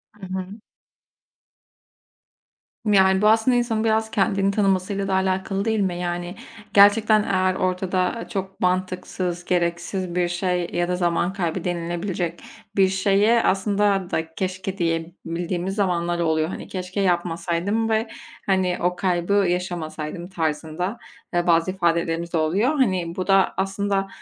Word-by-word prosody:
Hı 205 -2 -10
hı. 190 +3 -5 2.3
Yani 190 -2 +4
bu 210 - +4
aslında 225 +3 +4
insanın 225 -2 0
biraz 220 0 +1
kendini 195 0 +1
tanımasıyla 195 -1 0
da 190 - -1
alâkalı 190 +1 0
değil 220 -1 +1
mi? 185 -3 0
Yani 175 +1 -3 0.4
gerçekten 210 +1 +6
eğer 185 -1 +1
ortada 185 +3 -1
çok 195 -1 -5
mantıksız, 180 -1 -2
gereksiz 175 +1 -1
bir 180 -1 +2
şey 175 0 -1
ya 175 0 0
da 180 - 0
zaman 175 +1 0
kaybı 175 -2 -2
denilebilecek 175 0 -3 0.4
bir 190 -1 +5
şeye 200 +4 +3
aslında 195 -1 +1
da 160 0 -2
keşke 185 +1 -3
diyebildiğimiz 170 +2 -2
zamanlar 175 -4 0
oluyor. 160 -1 +1
Hani - - -7
keşke 185 +1 -4
yapmasaydım 175 +4 0
ve 220 +1 +1 0.4
hani 185 -2 +1
o 180 0 +1
kaybı 180 +1 0
yaşamasaydım 175 -3 -1
tarzında, 165 +4 -2 0.4
eee, 175 0 +1
bazı 170 +2 +3
ifadelerimiz 170 -1 0
de - - +2
oluyor. 185 - +2
Hani 185 -9 +1
bu 185 - -3
da 195 -1 +4
aslında, 195 0 -1
185 Hz, 130 wpm, -23 LUFS, 175-195 Hz, 2.3 s, gerçekten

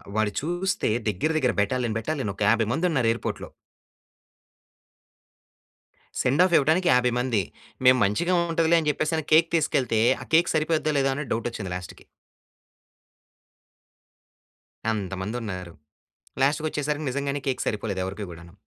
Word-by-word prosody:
వాడు 110 -1 +1
చూస్తే 175 +2 -1 0.2
దగ్గర 105 - 0
దగ్గర 125 -6 +1
బెటాలియన్ 115 +1 -1
బెటాలియన్ 135 -6 -3
ఒక - - -14
50 115 -1 +3
మంది 160 +8 0
ఉన్నారు 130 -8 +1
ఎయిర్పోర్ట్‌లో. 115 - -4 2.7
సెండ్ 140 +7 +3
ఆఫ్ 185 - -1
ఇవ్వటానికి 160 +6 +2
50 125 -1 +3
మంది. 125 -5 +1 0.4
మేము 130 0 +7
మంచిగా 170 - +1 0.2
ఉంటదిలే 165 0 +3
అని 150 - 0
చెప్పేసి, 155 +2 -1
కేక్ 165 +1 +5
తీసుకెళ్తే 125 -7 +1 0.2
ఆ - - -8
కేక్ 170 +1 +3
సరిపోద్దా 155 -1 +1
లేదా 135 0 +2
అని 145 -3 -5
డౌట్ 115 +1 -2
వచ్చింది 100 -5 -6
లాస్ట్‌కి. 90 -2 -9 2.9
అంతమంది 95 +1 -4
ఉన్నారు. 90 -5 -6 0.7
లాస్ట్‌కి 150 +3 +2
వచ్చేసరికి 150 0 -3
నిజంగానే 140 +1 -2
కేక్ 130 -2 -1
సరిపోలేదు, 105 -2 -2
ఎవరికీ 100 +2 -5
కూడాను. 85 0 -12
130 Hz, 130 wpm, -25 LUFS, 105-155 Hz, 2.9 s, మేము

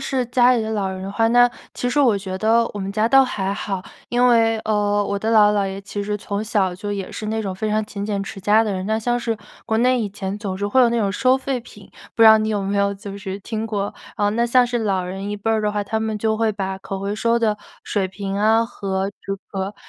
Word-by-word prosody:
是 265 -2 -1
家 250 0 +4
里 230 - 0
的 220 - -3
老 200 -3 -1
人 190 0 -6
的 195 - -5
话， 225 +2 +1
那 245 +1 +5 0.2
其 245 - -2
实 290 - 0
我 240 -7 +4
觉 190 -1 -5
得 230 +2 +3
我 - - -4
们 195 0 -3
家 215 +2 +1
倒 270 +1 +6
还 195 -5 -2
好。 195 -2 -4 0.3
因 245 +1 +3
为， 225 -1 +4
呃， 205 -1 +1
我 200 0 -2
的 220 +2 -1
姥 210 -2 +6
姥、 210 - 0
姥 195 - 0
爷 195 +1 -6
其 205 +1 -5
实 210 +1 -2
从 205 +1 -4
小 195 -4 0
就 205 +2 -5
也 195 -2 -4
是 215 - -6
那 220 +1 -1
种 190 -2 -3
非 215 +3 -3
常 215 0 0
勤 200 -1 -6
俭 200 -2 -2
持 195 0 -8
家 210 +4 +4
的 210 -3 -1
人。 185 0 -3
那 220 +1 0
像 240 +2 0
是 230 -2 -2 0.3
国 220 -1 0
内 250 +1 +3
以 210 - -2
前 195 0 -5
总 190 -3 -4
是 205 +1 -2
会 260 +6 +3
有 240 - +6
那 235 - +1
种 200 -3 +1
收 255 +5 +3
废 265 -1 -2
品， 210 -4 -15 0.2
不 230 - +3
知 - - +9
道 220 0 +9
你 215 0 -1
有 205 -2 -1
没 200 +1 -1
有 200 0 +2
就 200 0 -8
是 195 -1 -5
听 220 +1 -4
过。 205 -2 -2 0.2
呃， 205 0 +1
那 235 +2 +1
像 245 +1 +4
是 240 0 -1
老 195 -4 0
人 195 +2 -5
一 210 - -3
辈 215 +2 -2
儿 220 -1 +2
的 210 0 0
话， 205 -1 -1
他 220 +2 -2
们 220 -1 -2
就 220 0 0
会 225 -1 +1
把 190 -1 -4
可 195 0 -6
回 200 +1 -3
收 230 +2 +1
的 215 -2 +1 0.3
水 195 -3 0
瓶 195 0 -5
啊 220 +2 +3
和 195 -4 -3
这 195 - -4
个 195 +1 -4
210 Hz, 300 characters per minute, -21 LUFS, 200-225 Hz, 0.3 s, 知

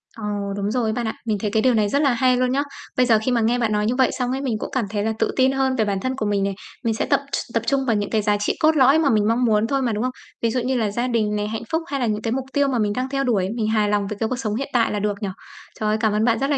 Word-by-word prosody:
Ồ, 225 - -9 0.3
đúng 205 +1 -2
rồi 245 -1 0
ấy - - 0
bạn 235 -1 -2
ạ, 220 - -2
mình 215 -3 0
thấy 210 0 -2
cái 220 0 +2
điều 255 +1 +3
này 210 -2 +2
rất 280 - +1
là 275 -4 +3
hay 255 0 +3
luôn 255 0 +1
nhá. 275 +2 +1 0.3
Bây 255 - +4
giờ 225 -3 +4
khi 255 - +1
mà 235 - +2
nghe 235 +3 +2
bạn 225 -2 0
nói 210 0 +1
như 235 +3 0
vậy 260 0 +3
xong 250 0 0
ấy, 265 - -2
mình 250 -6 -1
cũng - - -4
cảm 260 -4 0
thấy 205 -1 -2
là 220 - 0
tự - - +1
tin 260 0 +4
hơn 265 -1 +1
về 220 -4 +1
bản 200 -2 -1
thân 260 +5 -2
của 220 - -2
mình 205 -1 +1
này, 195 0 0 0.3
mình 225 -1 +1
sẽ - - -1
tập - - +2
tr - - 0 0.2
tập 230 - 0
trung 275 -1 +1
vào 230 -4 +2
những 205 -1 -1
cái 220 -2 +1
giá 205 0 +1
trị 205 - 0
cốt 315 0 +4
lõi 275 +2 +5
mà 290 -4 +2
mình 210 -2 +2
mong 240 +2 +2
muốn 215 -1 +2
thôi 275 0 0
mà, 245 - 0
đúng 215 +3 -1
không? 255 - 0 0.3
Ví 230 - +2
dụ 250 - 0
như 255 +1 0
là 215 -3 0
gia 240 +4 -1
đình 220 -4 0
này, 210 0 -1
hạnh 220 +1 -4
phúc 325 +1 +1
hay 275 -1 -3
là 245 - +1
những 215 -1 -1
cái 225 - -2
mục 260 +1 -2
tiêu 285 -1 +2
mà 255 -3 0
mình 210 -1 +1
đang 255 +1 -2
theo 275 0 -1
đuổi, 210 -8 +1
mình 215 -2 0
hài 215 -2 +2
lòng 205 -1 0
về 205 0 -5
cái 225 - 0
cuộc 255 -1 -3
sống 215 -4 -2
hiện 275 +3 -3
tại 235 -2 +2
là 210 - -1
được 205 0 -1
nhỉ? 200 - -2 0.5
Trời 215 -1 0
ơi, 215 - +2
cảm 220 -2 +1
ơn 210 +1 +1
bạn 230 -2 +2
rất 275 +1 0
là 285 - +2
230 Hz, 365 wpm, -22 LUFS, 210-260 Hz, 0.5 s, lõi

